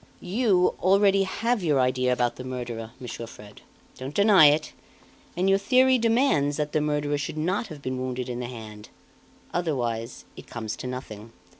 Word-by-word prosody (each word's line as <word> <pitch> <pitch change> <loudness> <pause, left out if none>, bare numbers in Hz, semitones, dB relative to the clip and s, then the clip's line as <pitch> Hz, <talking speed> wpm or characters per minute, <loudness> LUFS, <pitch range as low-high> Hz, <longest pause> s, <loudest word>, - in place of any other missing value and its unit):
You, 190 -1 +2
already, 195 +1 +4
have 230 +4 -1
your 150 -5 +2
idea 125 0 +1
about 125 -1 0
the 125 - -7
murderer, 120 -3 -5
Monsieur 120 -2 -7
Fred. 105 -2 -14 0.4
Don't 130 +3 -7
deny 200 -6 +7
it; 150 +1 +1 0.6
and 185 +2 +1
your 195 0 +4
theory 255 +4 +4
demands 225 - +2
that 150 -1 -2
the 155 - +1
murderer 150 -1 -1
should 145 - -4
not 185 +8 -1
have 150 -6 -11
been 130 0 -3
wounded 130 0 -3
in 125 -1 -4
the 125 - -4
hand, 110 -3 -10 0.6
otherwise 120 -9 -2
it - - -12
comes 110 -2 -5
to - - -6
nothing. 115 -4 -8
145 Hz, 170 wpm, -25 LUFS, 125-190 Hz, 0.6 s, deny